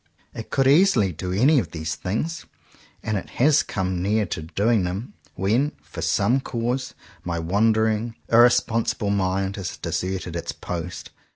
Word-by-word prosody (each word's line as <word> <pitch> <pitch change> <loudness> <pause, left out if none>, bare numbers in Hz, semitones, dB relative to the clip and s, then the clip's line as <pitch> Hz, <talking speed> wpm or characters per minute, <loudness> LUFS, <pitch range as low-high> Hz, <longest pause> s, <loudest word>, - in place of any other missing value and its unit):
It 115 -2 -8
could 135 - +1
easily 140 - +4
do 90 +4 -5
any 130 +10 +4
of - - -3
these 80 -1 -4
things; 130 - -3 0.6
and 110 -1 -1
it - - -12
has 150 +4 +5
come 95 -2 -2
near 105 +3 +1
to 85 - -4
doing 100 +6 +1
them, 95 +6 -4 0.2
when, 115 - +1
for 80 - -8
some 100 +9 +2
cause, 120 0 -3 0.3
my 85 -1 -3
wandering, 110 +5 +1
irrespon 115 -1 +4
sible 100 -2 -1
mind 95 0 -1
has 95 -3 -5
deserted 90 -2 -3
its 85 - -4
post. 90 0 -6
105 Hz, 155 wpm, -23 LUFS, 90-120 Hz, 0.6 s, has